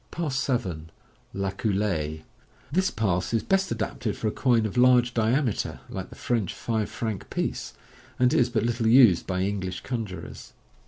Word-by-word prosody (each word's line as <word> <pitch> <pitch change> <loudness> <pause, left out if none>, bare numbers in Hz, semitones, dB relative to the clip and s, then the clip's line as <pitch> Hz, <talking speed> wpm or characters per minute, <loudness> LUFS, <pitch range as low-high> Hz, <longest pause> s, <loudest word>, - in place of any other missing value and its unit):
Pass 160 -5 -3
7. 95 - -2 0.4
{La 100 0 -2
Coulee). 95 -8 -1 0.2
— - - -30
This 185 +5 +2
pass 95 -1 0
is 115 - +1
best 195 0 +1
adapted 110 -4 -3
for 110 - -2
a - - +1
coin 120 -3 +2
of 105 - -4
large 125 -1 +5
diameter, 115 +1 0
like - - -6
the - - -12
French 115 -7 -1
five 110 -3 -2
franc 110 -4 -4
piece, - - -3 0.4
and 125 0 +3
is 120 -1 +3
but 110 -3 0
little 115 -1 0
used 115 -7 +6
by 95 -1 -1
English 95 -2 -2
conjurors. 110 -7 -6
110 Hz, 165 wpm, -26 LUFS, 95-125 Hz, 0.4 s, used